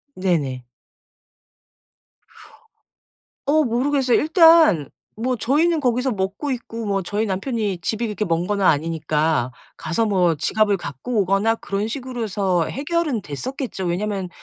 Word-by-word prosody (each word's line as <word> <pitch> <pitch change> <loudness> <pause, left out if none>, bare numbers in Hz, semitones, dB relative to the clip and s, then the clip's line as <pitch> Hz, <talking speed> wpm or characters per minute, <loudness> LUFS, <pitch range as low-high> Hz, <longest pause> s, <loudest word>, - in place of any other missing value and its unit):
네네. 150 -9 -1 2.8
어 305 +2 +3
모르겠어요. 260 +1 +1
일단 325 - +5 0.3
뭐 250 +2 -1
저희는 310 +8 +2
거기서 250 +1 +1
먹고 200 +8 -3
있고 230 -3 -5
뭐 195 -1 0
저희 210 +4 -1
남편이 205 -1 -2
집이 225 +5 -2
그렇게 210 0 -3
먼 170 0 0
건 205 -1 -1
아니니까 155 -5 +1 0.3
가서 170 +8 -1
뭐 180 -5 +2
지갑을 205 +5 +1
갖고 175 - -4
오거나 195 +4 +2
그런 200 0 -3
식으로서 220 -8 -1
해서 - - -5
해결은 295 -4 -1
됐었겠죠. 195 - -5
왜냐하면 190 +1 -2
210 Hz, 285 characters per minute, -21 LUFS, 180-255 Hz, 2.8 s, 일단